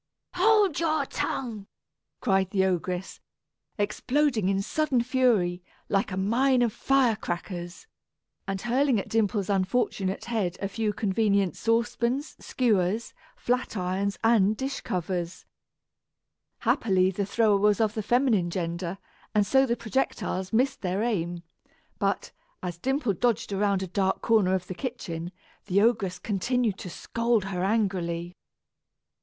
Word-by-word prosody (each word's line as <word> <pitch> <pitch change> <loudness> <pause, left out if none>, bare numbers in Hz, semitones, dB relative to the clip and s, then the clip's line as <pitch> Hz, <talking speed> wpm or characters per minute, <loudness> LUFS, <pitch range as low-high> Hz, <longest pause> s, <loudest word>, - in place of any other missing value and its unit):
"Hold 405 -2 +4
your 315 -2 +1
tongue!" 220 -6 -3 0.5
cried 195 -5 +2
the 190 -1 +2
ogress, 180 0 -2 0.6
exploding 225 +1 +1
in 195 0 +1
sudden 275 -2 +1
fury, 230 -9 +2 0.3
like 195 0 +1
a 185 - -3
mine 245 +6 +3
of 230 -3 0
fire 270 -4 +2
crackers, 175 - -5 0.6
and 195 0 -2
hurling 250 0 +2
at - - -5
Dimple's 210 -3 +1
unfortunate 195 0 0
head 210 -7 -1
a 195 - -2
few 215 +1 -1
convenient 200 -3 +1
saucepans, 235 +4 0
skewers, 215 -3 0 0.2
flat 250 -2 -1
irons, 190 +2 -1
and 215 -2 +4
dish 270 +1 -3
covers. 175 -1 -3 1.2
Happily 190 -3 +2
the 200 +2 -2
thrower 215 -1 +3
was 210 +2 +3
of 215 -2 +2
the 220 - -2
feminine 220 -5 +2
gender, 170 +1 -3 0.4
and 210 -1 +4
so 265 +6 +4
the 235 0 0
projectiles 220 -6 -2
missed 255 +5 +1
their 190 +2 -1
aim; 175 -7 -2 0.6
but, - - -1 0.3
as 175 -2 -4
Dimple 265 - 0
dodged 225 0 0
around 200 -1 +1
in 190 - -6
a - - -31
dark 190 -1 0
corner 210 -5 +3
of 180 -1 -3
the 185 - -5
kitchen, 175 -7 -5 0.4
the 195 0 +3
ogress 205 -5 +2
continued 210 +2 -1
to 180 - -6
scold 230 +4 0
her 185 -2 -3
angrily. 180 -5 -1
205 Hz, 135 wpm, -27 LUFS, 185-240 Hz, 1.2 s, Hold